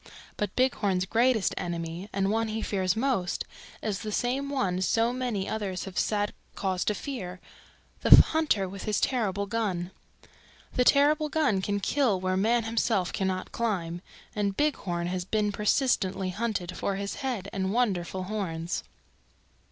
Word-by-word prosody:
But 205 -2 -3
Bighorn's 205 -8 +2
greatest 230 +1 +2
enemy, 170 +2 -4
and 195 0 0
one 225 +1 +1
he 220 0 -3
fears 190 -1 0
most, 225 -7 0 0.4
is 205 -3 -1
the 215 0 -5
same 260 +6 0
one 190 -10 0
so 230 +5 +2
many 240 -6 -2
others 200 -4 -3
have 190 -2 -3
sad 205 -1 0 0.2
cause 185 -2 -1
to 210 - +1
fear 185 -7 -5 0.6
the - - +10
hunter 305 -12 +4
with 195 +1 -7
his 210 -1 +1
terrible 200 -6 0
gun. 195 -5 -2 0.8
The 250 - +3
terrible 300 +3 +4
gun 285 -12 +2
can 205 +1 -1
kill 230 -3 +1
where 185 0 0
man 225 +5 +2
himself 225 -4 0
cannot 190 -1 -2
climb, 175 -7 -2 0.3
and 200 -2 -1
Bighorn 185 -13 0
has 180 +1 -2
been 210 +2 0
persistently 200 -3 +1
hunted 200 -4 -2
for 200 - -1
his 200 +1 -4
head 245 -8 -3
and 190 -1 -1
wonderful 190 -6 0
horns. 185 -4 -3
200 Hz, 150 wpm, -28 LUFS, 185-235 Hz, 0.8 s, the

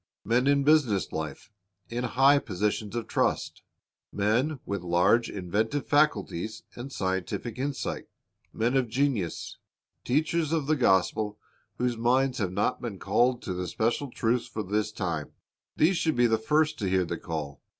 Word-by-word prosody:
Men 120 +5 +2
in 140 0 +4
business 135 - +3
life, 80 +5 -5 0.4
in 120 +1 -3
high 135 +3 +4
positions 105 -1 -2
of 120 -2 -2
trust, - - -1 0.5
men 120 +9 +1
with 100 -2 -3
large 90 +7 +3
inventive 105 +9 -1
faculties 110 - +1
and 130 +3 -8
scientific 95 +4 -3
insight, 140 0 -3 0.4
men 120 +4 0
of 130 -3 +2
genius, 120 - -1 0.4
teachers 155 +4 +1
of 160 -4 +1
the 155 +2 +2
gospel 105 -2 +2 0.4
whose 125 -1 0
minds 125 +3 +2
have 95 -4 -1
not 100 +6 0
been 115 -5 -5
called 125 +5 +1
to 95 - -3
the 90 0 -3
special 120 +8 -1
truths 120 0 0
for 110 - -4
this 105 +2 -1
time, 85 -8 -3 0.2
— - - -66
these 170 +4 +4
should 160 -2 +1
be 120 0 +4
the 110 -2 +2
first 155 +5 +1
to 100 -4 -1
hear 95 -1 +2
the 85 0 -4
call. 75 -4 -5
115 Hz, 160 wpm, -28 LUFS, 95-135 Hz, 0.5 s, in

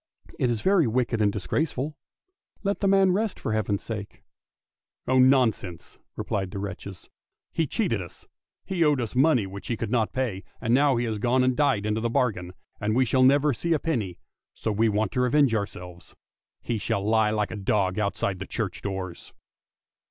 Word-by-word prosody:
" - - -20
It 125 - +2
is 115 -3 -1
very 190 - +3
wicked 115 -1 0
and 105 -1 +3
disgraceful; 145 - -2 0.7
let 200 0 0
the 200 - +1
man 195 -1 +5
rest 210 +3 -1
for 110 - -2
Heaven's 105 -2 -1
sake! 105 -3 -7 0.3
" - - -68
" - - -50
Oh 130 +1 +3
nonsense! 120 -10 +2
" - - -58
replied 95 -2 -2
the 100 - -7
wretches; 100 -1 -7 0.2
" - - -63
he - - 0
cheated - - 0
us, - - -10 0.4
he 180 -3 0
owed 150 -3 +3
us 115 -3 -3
money 130 -5 +4
which 100 +1 -8
he 115 - -2
could 110 -1 -4
not 115 -3 +1
pay, 120 -8 -2 0.2
and 115 0 0
now 140 +1 +4
he 120 +1 0
has 110 -2 -2
gone 125 +3 +2
and 130 0 +2
died 140 -8 +2
into 105 +1 0
the 115 - 0
bargain, 100 -7 -1 0.3
and 105 +1 0
we 130 +1 +4
shall 130 +2 +2
never 140 +2 +5
see 170 +8 -1
a 155 - +1
penny, 115 - -2 0.4
so 110 - -2
we 110 +2 +2
want 105 -1 0
to 125 - 0
revenge 125 0 +3
ourselves. 90 -4 -5 0.5
He 115 -2 -2
shall 100 0 -1
he 110 0 +3
like 105 -1 -1
a - - -4
dog 95 -1 0
outside 100 -2 -1
the 100 - -6
church - - -3
doors! 95 -3 -6
115 Hz, 205 wpm, -26 LUFS, 100-130 Hz, 0.7 s, man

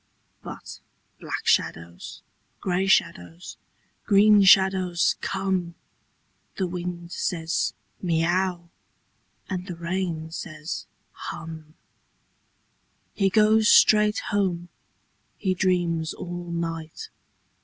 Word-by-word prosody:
But - - -9 0.4
black - - -5
shadows, 85 +1 -1 0.4
grey 185 +1 0
shadows, 90 - 0 0.5
green 205 +1 +6
shadows 190 -2 +4
come. 190 -3 -2 0.8
The 190 - -1
wind 175 -1 -5
says, 165 -3 -1
" - - -40
Miau! 175 +1 0 0.4
" - - -43
and 185 -1 -4
the 180 - -5
rain 170 -2 -3
says, 155 -1 -6
« - - -44 0.2
Hum! 160 -1 -9 0.6
" - - -44
He 195 -2 +2
goes 215 +2 +4
straight 210 0 +6 0.2
home. 180 -4 0 0.7
He 190 - 0
dreams 175 -3 0
all 175 0 -6
night. 165 -2 -5
175 Hz, 100 wpm, -25 LUFS, 165-190 Hz, 0.8 s, green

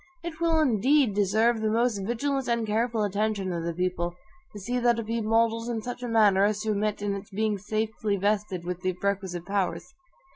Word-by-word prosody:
It 325 -1 -6
will 330 -1 +3
indeed 265 -2 +3
deserve 220 +3 +2
the 220 - +1
most 230 -1 +1
vigilant 255 +6 -1
and 235 -1 0
careful 225 +1 0
attention 205 -2 -1
of 170 -1 -3
the 170 - -1
people, 175 -1 -1 0.4
to 205 - -9
see 245 +6 -2
that 240 -1 +3
it 230 - -3
be 230 +1 -2
modeled 230 +1 +1
in 225 -2 -3
such 245 +1 -6
a 245 - -3
manner 210 -4 +4
as 210 +1 +1
to 220 0 -1
admit 210 0 -1
of 205 -1 0
its 200 0 -7
being 210 0 -1
safely 215 0 -2
vested 200 -2 -1
with 180 0 -4
the 185 0 0
requisite 190 -3 -2
powers. 195 +2 -2
215 Hz, 205 wpm, -27 LUFS, 200-230 Hz, 0.4 s, manner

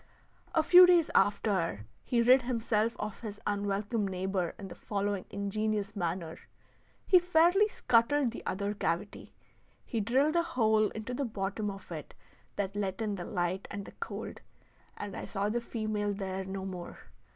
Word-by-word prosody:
A 320 - +4
few 360 +3 +9
days 345 -3 +4
after, 190 - +1 0.2
he 235 -1 +1
rid 255 +2 +6
himself 230 -2 0
of 210 -1 -5
his 210 -3 -7
unwelcome 205 +1 -1
neighbor 185 -2 -2
in 195 - -7
the 180 - -8
following 200 -2 -2
ingenious 205 +1 -2
manner: 170 -3 -3 0.7
he 365 - +7
fairly 355 +4 +4
scuttled 250 - +2
the 235 - -8
other 200 +2 -1
cavity; 175 0 -3 0.5
he 230 - -2
drilled 270 +9 +2
a 340 - +5
hole 220 -10 +2
into 220 +3 -6
the 280 - -1
bottom 210 -2 -3
of 195 -2 -9
it 155 -3 -7 0.4
that 200 0 -2
let 195 -2 -2
in 215 -2 -1
the 180 -3 -5
light 180 0 -2
and 200 -1 -6
the - - -10
cold, 460 - -7 0.6
and 205 -1 -6
I - - -5
saw 200 -1 -2
the 235 +2 -1
female 215 -3 -2
there 190 -1 -4
no 190 0 -5
more. 180 -2 -7
205 Hz, 160 wpm, -31 LUFS, 195-235 Hz, 0.7 s, few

